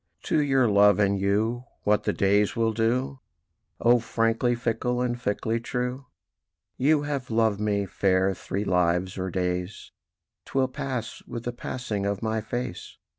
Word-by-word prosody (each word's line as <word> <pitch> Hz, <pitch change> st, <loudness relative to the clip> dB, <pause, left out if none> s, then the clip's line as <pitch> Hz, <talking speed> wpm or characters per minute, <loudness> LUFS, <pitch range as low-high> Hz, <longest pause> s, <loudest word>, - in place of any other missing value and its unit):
To 155 Hz, -, +2 dB
your 135 Hz, -3 st, +3 dB
Love 100 Hz, -1 st, +5 dB
and 100 Hz, -1 st, +2 dB
you 110 Hz, +5 st, 0 dB, 0.2 s
what 105 Hz, 0 st, +2 dB
the -, -, +2 dB
days 100 Hz, +1 st, +2 dB
will 115 Hz, -1 st, +1 dB
do, 125 Hz, +5 st, 0 dB, 0.6 s
O 120 Hz, +1 st, +5 dB
frankly 115 Hz, +1 st, +1 dB
fickle, 120 Hz, +1 st, -1 dB
and 125 Hz, -1 st, 0 dB
fickly 115 Hz, 0 st, -2 dB
true? 125 Hz, +2 st, -3 dB, 0.7 s
"You 145 Hz, +2 st, +3 dB
have 140 Hz, -3 st, -3 dB
loved 110 Hz, -3 st, +2 dB
me, 105 Hz, -1 st, 0 dB
Fair, 95 Hz, 0 st, +1 dB
three 95 Hz, +2 st, -4 dB
lives 90 Hz, 0 st, +1 dB
or 95 Hz, +1 st, -2 dB
days: 90 Hz, +1 st, -3 dB, 0.5 s
'Twill 130 Hz, -1 st, 0 dB
pass 130 Hz, -3 st, -4 dB
with 120 Hz, -1 st, -6 dB
the 120 Hz, -, -2 dB
passing 110 Hz, -5 st, -3 dB
of 100 Hz, 0 st, -2 dB
my 110 Hz, 0 st, 0 dB
face. 120 Hz, +3 st, -5 dB
115 Hz, 150 wpm, -26 LUFS, 100-125 Hz, 0.7 s, Love